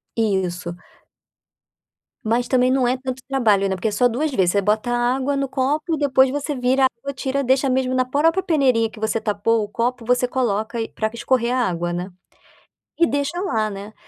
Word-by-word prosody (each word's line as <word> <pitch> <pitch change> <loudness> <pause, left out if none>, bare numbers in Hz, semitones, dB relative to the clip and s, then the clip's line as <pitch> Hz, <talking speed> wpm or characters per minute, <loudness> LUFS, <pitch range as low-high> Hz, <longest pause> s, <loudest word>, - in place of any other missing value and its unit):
Isso. 185 -5 -1 1.5
Mas 235 +3 0
também 255 -1 +3
não 260 -1 +2
é 250 +2 +1
tanto 260 0 -5
trabalho, 215 -7 +2
né, 190 - -1
porque 185 +4 -2
é - - 0
só 245 +4 +3
2 260 +7 -1
vezes, 190 -9 +2
você 200 - +1
bota 215 +4 0
água 255 +3 0
no 275 0 -1
copo 295 +5 -1
e - - -6
depois 270 -2 +3
você 290 +2 -3
vira 260 0 +1
a - - +7
água, 280 0 -5
tira, 270 +1 -2
deixa 265 +1 +2
mesmo 255 0 0
na 255 0 +2
própria 320 +8 +1
peneirinha 260 -10 +2
que 220 - -13
você 220 +1 -1
tapou 215 +1 +1
o 205 - -6
copo, 240 +3 -2
você 250 +1 +2
coloca 235 -2 -1
e 225 - -4
para 220 - -2
escorrer 240 0 0
a 255 -2 +1
água, 175 0 -3
né. 180 +2 -4 0.9
E 335 - +5
deixa 285 +4 -2
lá, 220 - 0
né. 200 +1 -8
250 Hz, 200 wpm, -21 LUFS, 215-270 Hz, 1.5 s, a